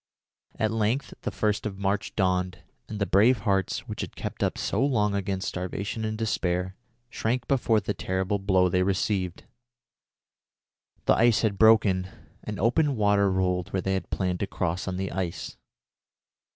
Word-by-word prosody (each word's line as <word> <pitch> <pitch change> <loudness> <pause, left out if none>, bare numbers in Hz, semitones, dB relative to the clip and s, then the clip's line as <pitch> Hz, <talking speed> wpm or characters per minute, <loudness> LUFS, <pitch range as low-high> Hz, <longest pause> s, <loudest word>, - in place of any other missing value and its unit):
At 110 -1 +1
length 115 +5 0
the - - -2
first 105 0 -1
of 95 -2 -7
March 100 +1 -1
dawned, 90 -2 0 0.3
and 110 - -5
the 100 - +1
brave 110 +4 +4
hearts, 95 -3 0
which - - -5
had - - -6
kept - - -6
up - - 0
so - - 0
long 105 -7 +2
against 100 -1 -2
starvation 100 +4 -4
and 110 0 -3
despair, 95 -4 -1 0.4
shrank 120 +2 -1
before 120 -5 +2
the 105 0 -3
terrible 95 +2 -1
blow 95 -1 +3
they 90 +1 +1
received. 95 -1 -1 1.6
The - - +5
ice 115 -1 +4
had 100 -3 0
broken, 105 -4 +5 0.4
and 105 -1 -5
open 140 +6 +2
water 100 -2 +3
rolled 90 -1 0
where 95 - 0
they 95 - 0
had 95 - -3
planned 90 -2 -1
to 100 - -1
cross 90 +2 -2
on 90 -1 -2
the 95 0 -3
ice. 90 -3 -4
100 Hz, 165 wpm, -27 LUFS, 95-110 Hz, 1.6 s, The